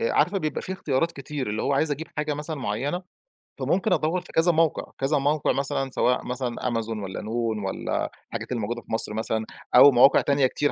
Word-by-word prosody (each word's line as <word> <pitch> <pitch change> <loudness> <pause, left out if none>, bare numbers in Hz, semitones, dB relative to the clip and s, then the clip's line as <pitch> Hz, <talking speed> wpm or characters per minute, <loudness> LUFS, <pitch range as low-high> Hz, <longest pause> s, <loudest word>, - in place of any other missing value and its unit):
عارفة 170 - +2
بيبقى 155 -5 -3
في 190 - -4
اختيارات 165 -2 0
كتير 140 -5 -5
اللي 110 +1 -2
هو - - +1
عايز 150 +3 +2
أجيب 150 +3 -3
حاجة 150 0 -1
مثلًا 150 +2 -5
مُعيّنة 135 - -2 0.6
فممكن 190 +2 +1
أدوّر 175 +2 +1
في - - -14
كذا 165 +2 +4
موقِع، 165 -1 +1
كذا 140 +3 +1
موقِع 145 +1 +1
مثلًا 135 -1 -1
سواء 125 0 +1
مثلًا 125 -1 -3
Amazon 115 -2 -2
والّا 95 -1 -5
noon 110 -1 -2
والّا 95 - -2 0.2
الحاجات - - -6
الموجودة 120 0 -2
في - - -15
مصر 110 -1 0
مثلًا، 110 0 -2 0.3
أو 145 - +10
مواقع 125 +2 +6
تانية 140 -2 +3
كتير 145 +3 0
140 Hz, 195 wpm, -25 LUFS, 120-155 Hz, 0.6 s, أو